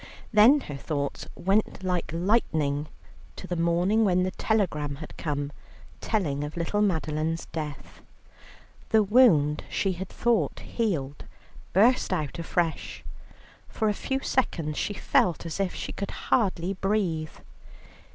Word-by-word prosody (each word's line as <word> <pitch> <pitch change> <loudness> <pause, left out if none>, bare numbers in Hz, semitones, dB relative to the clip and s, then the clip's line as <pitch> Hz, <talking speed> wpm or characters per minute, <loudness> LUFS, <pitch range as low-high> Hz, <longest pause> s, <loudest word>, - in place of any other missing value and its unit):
Then 235 +8 +7
her 145 - -7
thoughts 140 0 -3
went 195 +2 0
like 180 -2 -1
lightning 160 -6 +1 0.5
to - - -8
the 180 - -3
morning 175 +6 +2
when 185 -3 +3
the 185 - -1
telegram 160 -11 0
had 155 +2 -10
come 145 -2 -3 0.5
telling 150 -10 -1
of 150 +3 -6
little 170 +5 0
Madeline's 160 -4 0
death. 150 -3 -6 0.9
The 220 -2 +5
wound 190 - +4
she 195 - 0
had 185 +1 -5
thought 235 -2 +1
healed 150 - -2 0.5
burst 230 +6 +4
out 155 -3 -2
afresh; 165 0 -2 0.7
for 220 - 0
a - - +1
few 265 +6 -2
seconds 165 - 0
she 205 - -2
felt 175 -3 +1
as 165 +3 -5
if 195 -2 -1
she - - -5
could 200 - -4
hardly 190 -5 0
breathe. 185 -5 -1
175 Hz, 130 wpm, -27 LUFS, 155-210 Hz, 0.9 s, Then